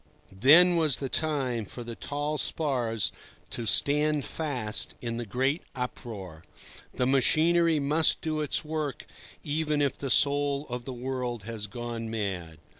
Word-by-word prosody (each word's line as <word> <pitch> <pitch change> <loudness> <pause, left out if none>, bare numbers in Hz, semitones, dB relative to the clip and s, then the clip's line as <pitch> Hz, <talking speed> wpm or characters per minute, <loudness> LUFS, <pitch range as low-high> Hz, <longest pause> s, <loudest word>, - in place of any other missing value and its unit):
Then 155 - +6
was 155 -5 +3
the 135 - -4
time 135 -8 -1
for 120 +5 -8
the 120 0 -6
tall 145 +4 -3
spars 120 -8 0 0.4
to 115 - -3
stand 150 +5 +4
fast 125 -9 -2
in 115 -1 -4
the 120 -1 -5
great 130 - 0
uproar. 105 -9 -6 0.5
The 125 - +1
machinery 160 +5 +3
must 150 +3 +2
do 155 -1 -2
its 150 +1 -1
work 150 -3 -3 0.4
even 150 0 0
if 140 -2 +1
the 140 - -5
soul 145 +1 +2
of 120 0 -5
the 135 - -5
world 125 -2 -4
has 110 -1 -5
gone 120 0 -5
mad. 95 -7 -4
135 Hz, 145 wpm, -28 LUFS, 115-150 Hz, 0.5 s, Then